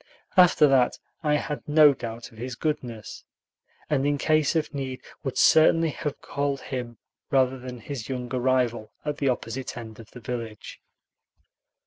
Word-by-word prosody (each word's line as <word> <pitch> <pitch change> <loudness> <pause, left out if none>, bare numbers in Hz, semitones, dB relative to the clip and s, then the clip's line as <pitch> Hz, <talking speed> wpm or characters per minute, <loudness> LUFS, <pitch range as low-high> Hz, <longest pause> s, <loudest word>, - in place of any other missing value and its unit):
After 180 -5 +6
that 130 -3 +3 0.2
I 150 -2 +2
had 150 0 -2
no 150 -1 +7
doubt 115 -2 -7
of 110 - -15
his 125 +1 -5
goodness, 120 -7 -4 0.6
and 140 -3 +1
in 145 0 +1
case 155 +1 +2
of 155 -1 0
need 130 -2 -5 0.2
would 135 - -3
certainly 160 0 +5
have 145 0 -4
called 140 -1 -2
him 120 -3 -5 0.3
rather 130 -1 +2
than 125 -1 -8
his 125 -1 -6
younger 125 -1 -3
rival 120 -4 +1
at 150 -1 -2
the 140 - +2
opposite 125 +1 -3
end 110 -2 -9
of 115 - -12
the - - -11
village. 115 -2 -6
130 Hz, 155 wpm, -26 LUFS, 120-145 Hz, 0.6 s, no